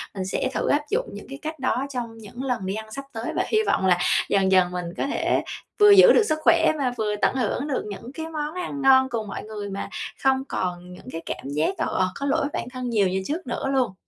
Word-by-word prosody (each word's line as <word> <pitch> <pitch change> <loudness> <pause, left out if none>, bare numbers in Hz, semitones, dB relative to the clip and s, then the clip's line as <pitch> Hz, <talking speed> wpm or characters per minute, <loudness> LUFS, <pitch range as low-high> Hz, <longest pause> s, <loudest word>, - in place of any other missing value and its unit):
Mình 190 -1 -3
sẽ 225 +7 -1
thử - - -1
áp 290 - +3
dụng - - 0
những - - -9
cái 275 0 -8
cách 315 0 -5
đó 260 0 0
trong 240 -4 -5
những 225 +2 -12
lần 250 -7 -2
đi 190 - -2
ăn 220 0 -7
sắp 275 +5 -6
tới, 225 +1 -4
và - - +2
hy 435 - +1
vọng 190 - +2
là 180 -2 +4 0.3
dần 195 -1 +2
dần 185 -2 +4
mình 180 -1 -3
có - - -1
thể - - 0 0.4
vừa 415 0 +8
giữ 405 +5 +9
được 455 - +5
sức 310 -6 0
khỏe, 330 -1 +5
và 260 -4 0
vừa 210 -2 0
tận - - +2
hưởng 255 +3 -1
được 275 - -1
những 230 +5 -8
cái 320 +1 -5
món 305 -1 -4
ăn 350 -6 -4
ngon 265 -1 +6
cùng 225 -3 -3
mọi - - -6
người, 210 -1 -6
mà 195 0 -5 0.3
không 265 0 +3
còn 180 -1 -3
những 180 - -12
cái 165 - -5
cảm 135 - -5
giác, 150 +2 0
ờ, - - 0
ờ, 185 0 +2
có 280 - -4
lỗi 280 - +2
với 280 - -1
bản - - -3
thân 255 -1 -5
nhiều 210 -4 +3
như 190 +1 -1
trước 315 0 -3
nữa 245 - -2
luôn. 250 -7 +1
245 Hz, 265 wpm, -24 LUFS, 195-280 Hz, 0.4 s, giữ